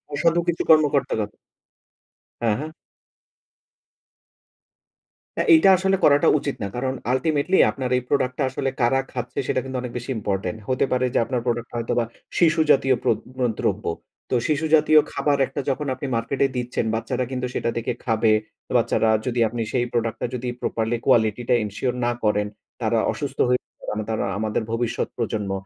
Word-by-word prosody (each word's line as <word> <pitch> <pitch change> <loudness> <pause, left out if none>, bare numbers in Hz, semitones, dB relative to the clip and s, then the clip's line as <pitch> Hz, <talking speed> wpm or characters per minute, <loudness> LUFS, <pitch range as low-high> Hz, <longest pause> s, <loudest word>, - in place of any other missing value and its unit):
অসাধু 165 +3 +2
কিছু 170 -1 0
কর্মকর্তারা। 145 -8 +3 1.2
হ্যাঁ, 115 -3 +2
হ্যাঁ। 150 - -4 2.7
হ্যাঁ, - - +1
এইটা 255 -11 +6
আসলে 190 +1 +2
করাটা 145 0 +5
উচিত 140 0 -3
না। - - -1
কারণ, 130 +1 -1 0.2
আল্টিমেটলি 155 +6 +1
আপনার 130 -2 -4
এই - - -1
প্রোডাক্ট 130 -3 +1
টা 140 - +2
আসলে 135 +1 -2
কারা 120 +3 +3
খাচ্ছে? 125 -1 -4
সেটা - - +1
কিন্তু 130 -1 -5
অনেক 125 -1 -5
বেশি 120 +2 -7
ইম্পোর্টেন্ট। 100 -1 -2
হতে 130 +1 +2
পারে 130 0 +2
যে, - - +3
আপনার 125 -2 -2
প্রোডাক্ট 120 -1 -1
টা - - -9
হয়তোবা 115 +1 0 0.4
শিশু 165 -2 +4
জাতীয় 135 -1 +4
প্র - - +2 0.3
ম - - -4 0.2
দ্রব্য। 105 +1 -1 0.4
তো - - +1
শিশু 155 +1 0
জাতীয় 155 0 +6
খাবার 145 -1 +1
একটা 140 - -4
যখন 145 +2 -2
আপনি 130 +2 -5
মার্কেটে 130 +4 0
দিচ্ছেন, 125 -1 -2
বাচ্চারা 125 +2 -2
কিন্তু 125 -1 -2
সেটা - - 0
দেখে 115 +1 -1
খাবে। 110 -1 +2 0.5
বাচ্চারা, 110 - +2 0.2
যদি 125 -1 -1
আপনি 115 +1 -4
সেই 120 -1 +1
প্রোডাক্ট 115 -1 -1
টা - - 0
যদি 125 0 -4
প্রপারলি 115 +1 -1
কোয়ালিটি 110 +1 +3
টা - - +5
এনশিওর 115 +5 -2
না 120 - +2
করেন, 105 -1 +2 0.3
তারা - - +1
অসুস্থ - - -5
হয়ে 125 0 +2 0.3
আম 110 - -2
তারা 110 - -1
আমাদের 110 +1 -1
ভবিষ্যৎ 115 0 -1
প্রজন্ম। 110 -4 -2
125 Hz, 170 wpm, -23 LUFS, 115-140 Hz, 2.7 s, এইটা